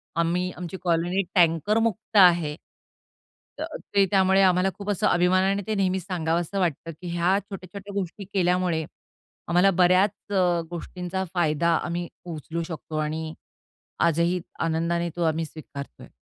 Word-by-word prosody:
आम्ही 175 +2 0
आमची 180 +1 -6
कॉलनी 175 +2 +1
टँकरमुक्त 210 +6 +2
आहे. 170 -5 +6 1.0
अ, - - -2 0.3
ते 200 -1 +6
त्यामुळे 190 -1 +4
आम्हाला 185 0 +4
खूप 205 0 -6
असं 200 - +1
अभिमानाने 185 +3 +3
ते 215 - 0
नेहमीच 190 -2 0
सांगावसं 170 +1 -1
वाटतं, 165 -2 -1
की 180 - -6
ह्या 175 +3 +2
छोट्या-छोट्या 200 0 -9
गोष्टी 195 +2 -6
केल्यामुळे 180 -3 +1 0.6
आम्हाला 180 +3 +4
बऱ्याच 185 +2 +4 0.2
अ, 180 -3 +2
गोष्टींचा 180 +2 -4
फायदा 170 -1 +2
आम्ही 175 0 -3 0.2
उचलू 165 0 -5
शकतो 160 -2 -6
आणि 155 +1 -2 0.7
आजही 170 +2 +1 0.2
आनंदाने 170 +1 0
तो 175 - -1
आम्ही 160 0 +1
स्वीकारत 150 -2 -9
आहे. - - -12
175 Hz, 135 wpm, -25 LUFS, 165-190 Hz, 1.0 s, आहे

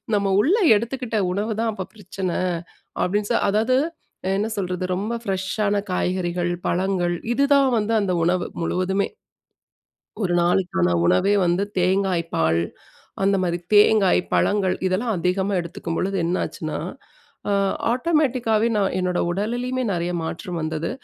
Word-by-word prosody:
நம்ம 200 -1 +1
உள்ளே 385 - +3
எடுத்துக்கிட்ட 235 +1 -3 0.2
உணவுதான் 220 +3 -1
அப்போ 190 -3 -5
பிரச்சன, 190 -3 -4 0.7
அப்படின் 205 +3 0
சொல் 235 - +2
அதாவது 220 +5 +2 0.6
என்ன 210 - 0
சொல்றது? 180 -1 -2
ரொம்ப 205 +5 -2
ஃப்ரெஷ்ஷான 200 +1 -1 0.2
காய்கறிகள், 180 -1 -1 0.2
பழங்கள் 180 -1 0 0.2
இதுதான் 280 +1 +4
வந்து 220 +1 0
அந்த 190 -2 0
உணவு, 175 +1 +1 0.2
முழுவதுமே. 185 +3 0 1.2
ஒரு 175 -2 0
நாளுக்கான 170 - +1
உணவே 190 - +3
வந்து 175 +3 +2 0.2
தேங்காய் 185 -1 +1
பால் 80 +1 +2 0.6
அந்த 195 0 +3
மாதிரி. 175 -1 0 0.2
தேங்காய், 205 -2 +5
பழங்கள் 195 -3 +2
இதெல்லாம் 215 +4 0
அதிகமா 190 +3 0
எடுத்துக்கும்பொழுது 170 +3 -3
என்னாச்சுன்னா, 175 +2 -2 0.7
அ - - +1 0.4
ஆட்டோமேட்டிக்காவே 250 -6 +1
நான் 195 -3 +1
என்னோட 180 -1 0
உடலிலேயுமே 245 +7 -2
நெறைய 175 -1 -1
மாற்றம் 170 +2 -5
வந்தது. 155 +1 -2
195 Hz, 120 wpm, -23 LUFS, 180-220 Hz, 1.2 s, தேங்காய்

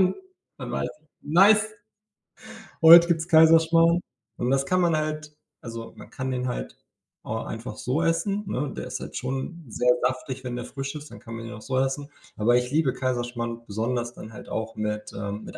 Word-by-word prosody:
dann 185 0 +3 0.4
dann - - -6
weiß - - -1
ich: 155 - -33
„Nice, 205 +7 +5 1.2
heut 170 +1 +10
gibt's 165 -1 0
Kaiserschmarrn“, 165 +1 +5 0.4
und 120 - -1
das 135 0 +2
kann 185 +4 +2
man 170 -2 +3
halt 155 -1 -4 0.3
also, 115 -1 -8
man - - -12
kann 130 -1 -4
den 125 0 -2
halt - - -5 0.5
auch 110 +1 -4
einfach 115 +2 -6
so 145 +7 -1
essen, 195 +5 0
ne? 140 -5 -2
Der - - -4
ist - - -5
halt - - -8
schon 135 +6 -4
sehr 125 +2 0
saftig, 130 +1 -2
wenn 125 -1 -4
der 120 - -5
frisch 135 0 -5
ist, 150 0 -8
dann - - -11
kann 115 -1 -10
man 115 - -7
ihn 105 - -7
auch 105 - -10
so 130 -1 0
essen. 135 +2 -1 0.3
Aber 120 +3 +3
ich 125 0 -1
liebe 150 -3 +2
Kaiserschmarrn 120 -2 -3
besonders 120 +3 -2
dann 110 - -10
halt - - -11
auch 110 0 -4
mit 105 0 -3
ähm, 100 +1 -5
mit - - -9
130 Hz, 195 wpm, -25 LUFS, 115-160 Hz, 1.2 s, heut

